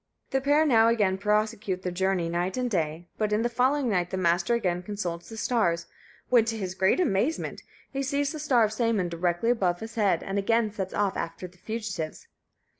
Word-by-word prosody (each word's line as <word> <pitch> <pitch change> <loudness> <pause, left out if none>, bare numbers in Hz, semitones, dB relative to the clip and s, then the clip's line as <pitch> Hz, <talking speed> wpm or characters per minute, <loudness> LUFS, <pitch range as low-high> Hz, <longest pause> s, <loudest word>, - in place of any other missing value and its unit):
The 270 - +1
pair 290 +3 +3
now 225 -6 +5
again 205 -5 +2
prosecute 210 -2 0
their 180 - -2
journey 185 -1 0
night 175 +5 -1
and 250 -1 -1
day; 165 -2 -1
but, 215 -1 0
in 210 +2 +2
the 240 - +1
following 260 +3 +1
night, 180 -5 +1
the 190 - -3
Master 175 +4 +2
again 180 -6 0
consults 180 -3 -5
the 225 - -8
stars, 190 -9 +1 0.4
when, 240 -3 +6
to 225 0 -2
his 185 -4 -4
great 190 - +2
amazement, 270 - 0 0.3
he 275 - -1
sees 280 +1 0
the 310 - -6
star 265 -6 +3
of 215 - +1
Sæmund 215 -6 0
directly 175 +6 +1
above 180 -7 +1
his 225 +1 -7
head, 200 -7 +1
and 195 +1 -2
again 225 +2 +1
sets 190 -3 -5
off 200 -2 +1
after 165 +2 -4
the 180 0 -21
fugitives. 210 -8 -5
210 Hz, 200 wpm, -27 LUFS, 180-235 Hz, 0.4 s, when